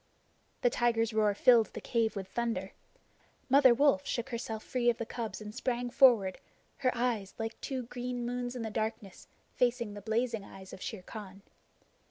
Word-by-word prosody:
The 245 - +3
tiger's 230 -2 +1
roar 210 -2 +2
filled 235 -1 +6
the - - -5
cave 230 -2 0
with 195 -2 -5
thunder. 210 -4 -2 0.8
Mother 270 -1 +7
Wolf 280 +3 +4
shook 240 +1 -2
herself 225 -3 -5
clear 245 -1 +2
of 235 - +1
the 230 - -3
cubs 225 -1 -5
and 210 -1 -8
sprang 245 0 -2
forward, 230 -8 +5 0.4
her 260 -2 +2
eyes, 235 -5 -1
like 225 0 -5
two 260 -2 -3
green 245 0 -4
moons 245 0 -3
in 240 - -4
the 220 - -4
darkness, 215 -2 -4 0.3
facing 240 -3 0
the 205 - -8
blazing 225 +1 -1
eyes 190 -1 -12
of 185 - -10
Shere 210 -5 -5
Khan. 195 -1 -9
230 Hz, 175 wpm, -31 LUFS, 215-245 Hz, 0.8 s, Mother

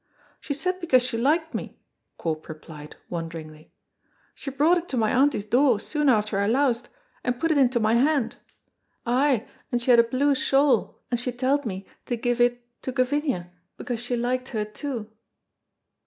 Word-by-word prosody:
"She 285 - -4
said 365 +5 -1
because 260 -7 +4
she 250 -1 -2
liked 310 +7 +1
me," - - -5 0.4
Corp 155 -2 -4
replied, 155 -1 -10
wonderingly. 165 -2 -7 0.6
"She 275 - -6
brought 300 +6 +3
it 345 - -12
to 260 - -2
my 220 -2 +2
auntie's 265 -5 +2
door 245 0 +3
soon 295 +6 0
after 215 -4 +2
I 200 - +1
loused, 245 0 +1 0.3
and 245 0 -1
put 330 0 +1
it 305 - +3
into 250 -2 +3
my 220 0 +2
hand: 255 -1 +2 0.7
ay, 255 0 +2 0.2
and 245 - +1
she 240 +1 +2
had 240 - +7
a - - +8
blue 260 +5 +2
shawl, 275 +1 +2
and 240 - +1
she 250 +1 -2
telled 260 +2 0
me 190 -1 -5 0.2
to 240 - 0
give 245 +1 0
it 245 0 +2 0.2
to 260 - -3
Gavinia, 255 - 0 0.3
because 240 -2 -4
she 245 +1 -2
liked 255 +2 -1
her 215 -3 -2
too." 225 0 -6
245 Hz, 175 wpm, -25 LUFS, 220-275 Hz, 0.7 s, a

